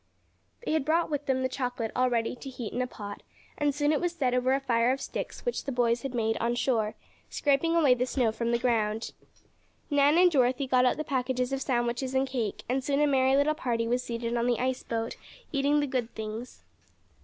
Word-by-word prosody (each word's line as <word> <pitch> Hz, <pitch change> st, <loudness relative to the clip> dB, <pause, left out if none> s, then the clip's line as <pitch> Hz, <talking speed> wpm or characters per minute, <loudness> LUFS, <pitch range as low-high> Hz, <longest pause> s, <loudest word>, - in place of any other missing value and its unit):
They -, -, -1 dB
had 315 Hz, -2 st, +1 dB
brought 320 Hz, +3 st, +1 dB
with 290 Hz, -1 st, -2 dB
them 260 Hz, -1 st, +1 dB
the -, -, +2 dB
chocolate 245 Hz, -3 st, -3 dB
all 255 Hz, 0 st, +3 dB
ready 230 Hz, 0 st, 0 dB
to 270 Hz, +2 st, -9 dB
heat 245 Hz, -4 st, -6 dB
in 250 Hz, -, -1 dB
a 250 Hz, -, -1 dB
pot, 205 Hz, -4 st, -8 dB, 0.3 s
and 295 Hz, -, +1 dB
soon 290 Hz, 0 st, +2 dB
it 305 Hz, -, +1 dB
was 350 Hz, -1 st, 0 dB
set 260 Hz, -7 st, 0 dB
over 250 Hz, +1 st, +2 dB
a -, -, 0 dB
fire 240 Hz, -2 st, +2 dB
of 265 Hz, -, -1 dB
sticks -, -, -6 dB
which 485 Hz, -, -2 dB
the 275 Hz, -, -2 dB
boys 240 Hz, -1 st, +1 dB
had 270 Hz, -2 st, -5 dB
made 225 Hz, -1 st, 0 dB
on 235 Hz, +1 st, 0 dB
shore, 225 Hz, -4 st, 0 dB, 0.3 s
scraping 290 Hz, +4 st, +1 dB
away 295 Hz, -6 st, +5 dB
the 250 Hz, +1 st, -1 dB
snow 250 Hz, -4 st, +1 dB
from 235 Hz, +1 st, -2 dB
the 235 Hz, -, +3 dB
ground. 225 Hz, -3 st, 0 dB, 0.8 s
Nan 285 Hz, +2 st, +4 dB
and 360 Hz, 0 st, +6 dB
Dorothy 255 Hz, -1 st, +2 dB
got 255 Hz, -1 st, +3 dB
out 250 Hz, -, +2 dB
the 310 Hz, -, -2 dB
packages 255 Hz, -2 st, -1 dB
of 270 Hz, -, -2 dB
sandwiches 245 Hz, +1 st, -1 dB
and 265 Hz, +1 st, +2 dB
cake, 240 Hz, -6 st, -3 dB
and 260 Hz, +2 st, 0 dB
soon 280 Hz, +1 st, 0 dB
a 295 Hz, -, +4 dB
merry 265 Hz, -2 st, +3 dB
little 285 Hz, +2 st, +3 dB
party 235 Hz, -6 st, -1 dB
was 245 Hz, +2 st, +1 dB
seated 235 Hz, -1 st, -3 dB
on 235 Hz, 0 st, +1 dB
the 240 Hz, -2 st, +2 dB
ice 255 Hz, 0 st, -1 dB
boat, 230 Hz, 0 st, -3 dB, 0.4 s
eating 285 Hz, +1 st, +2 dB
the -, -, +1 dB
good 255 Hz, -4 st, -2 dB
things. 220 Hz, -, -7 dB
255 Hz, 225 wpm, -28 LUFS, 235-275 Hz, 0.8 s, and